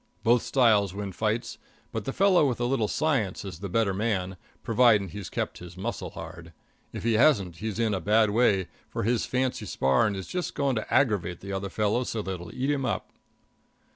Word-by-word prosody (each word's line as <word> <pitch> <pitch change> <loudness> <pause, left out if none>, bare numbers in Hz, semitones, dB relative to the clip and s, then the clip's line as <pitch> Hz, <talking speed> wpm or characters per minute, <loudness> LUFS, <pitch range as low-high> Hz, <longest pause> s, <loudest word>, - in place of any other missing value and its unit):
Both 120 +1 +4
styles 105 -7 +3
win 100 -1 -4
fights, 110 +4 -2 0.3
but 110 -2 -4
the - - -2
fellow 185 -3 +4
with 120 - -3
a 120 - 0
little 120 -4 +1
science 135 -13 0
is 90 -4 -7
the 100 0 -5
better 105 0 +1
man, 95 -3 -1 0.3
providing 115 -4 +4
he's 100 +2 -7
kept - - -3
his 90 0 -11
muscle 95 - -4
hard. 85 0 -10 0.4
If - - -6
he 115 0 +2
hasn't, 105 - +3
he's 110 0 -4
in 115 -2 +1
a 95 - -2
bad 105 +3 +3
way, 100 -5 +3 0.2
for - - -3
his 115 +2 +1
fancy 125 -4 -1
sparring 95 - +2
is 95 -1 -5
just 180 -1 -4
going 140 -2 +1
to 110 - -5
aggravate 100 -9 +1
the 100 0 -6
other 95 0 -3
fellow 105 +4 0
so 110 -3 -3
that 95 -2 -4
he'll 85 0 -9
eat 135 +3 -1
him 140 -2 -1
up. 125 - -2
105 Hz, 200 wpm, -27 LUFS, 95-120 Hz, 0.4 s, Both